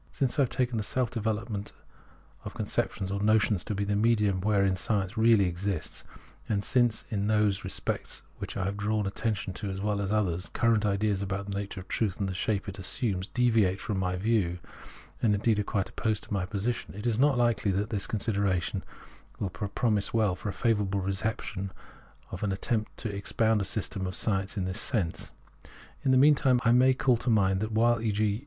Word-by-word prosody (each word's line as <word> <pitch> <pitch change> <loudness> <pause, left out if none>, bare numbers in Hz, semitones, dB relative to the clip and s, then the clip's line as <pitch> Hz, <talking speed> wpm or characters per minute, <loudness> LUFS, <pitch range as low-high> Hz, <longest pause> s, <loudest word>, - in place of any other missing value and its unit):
Since 135 0 -1
I - - +6
have 130 - +2
taken 125 -2 0
the 110 - -1
self 125 +3 0
development 110 -2 -3 0.7
of - - -7
conceptions 95 0 -2
or 100 0 -2
notions 110 -2 +3
to 105 - -2
be 100 - -1
the 100 0 0
medium 105 -3 +2
wherein 100 -2 +2
science 100 +1 -1
really 110 -3 +5
exists, 90 0 -3 0.5
and 100 -2 0
since 120 -3 +2
in 100 -1 0
those 105 -2 +2
respects - - -2
to - - -29
which - - -5
I - - -1
have 100 +1 -2
drawn 105 0 0
attention 105 -1 -2 0.2
as 95 0 -4
well 105 0 -1
as 100 - -2
in 105 - +1
others, 90 -4 0
current 115 -3 +2
ideas 100 0 +1
about 100 0 -3
the - - -3
nature 100 -1 -4
of 95 - -10
truth 105 -5 -1
and 100 - 0
the 95 - -3
shape 100 +2 -1
it 100 0 -6
assumes 95 -1 -1
deviate 110 -7 +2
from 105 -4 -2
my 90 -1 0
view, 95 -3 +1 0.6
and 105 -3 +3
indeed 105 +1 +2
are - - +1
quite 100 -1 -1
opposed 110 -2 -1
to - - -6
my 95 -3 -1
position, 105 +2 -3
it 105 - -7
is 115 -1 +1
not 140 -1 +4
hkely 120 -4 +2
that 105 +3 -1
the 105 - 0
consideration 100 -4 0
of - - -15 0.6
all 100 - -1
this 85 -1 -15
will 100 - 0
pro 115 +3 0
mise 105 -2 0
well 105 -5 +2
for 100 - -5
a - - -1
favourable 100 -1 0
reception 95 0 -3 0.6
of 90 - -6
an 105 - 0
attempt 110 +3 -2
to 105 -4 -4
ex 100 - -6
pound 110 -2 +2
the - - -1
system 95 -2 -2
of 90 - -4
science 100 -2 -1
in 95 - 0
this 95 +3 -2
sense. 100 -11 -2 0.7
In - - 0
the 130 - +5
mean 145 +3 +7
time, 130 -3 +3
I 115 - +5
may 130 +2 +5
call 130 -2 +3
to 120 - -2
mind 95 -4 +3
that 110 +2 -2
while 115 +1 +3
e.g. 105 -1 0
105 Hz, 215 wpm, -29 LUFS, 95-115 Hz, 0.7 s, mean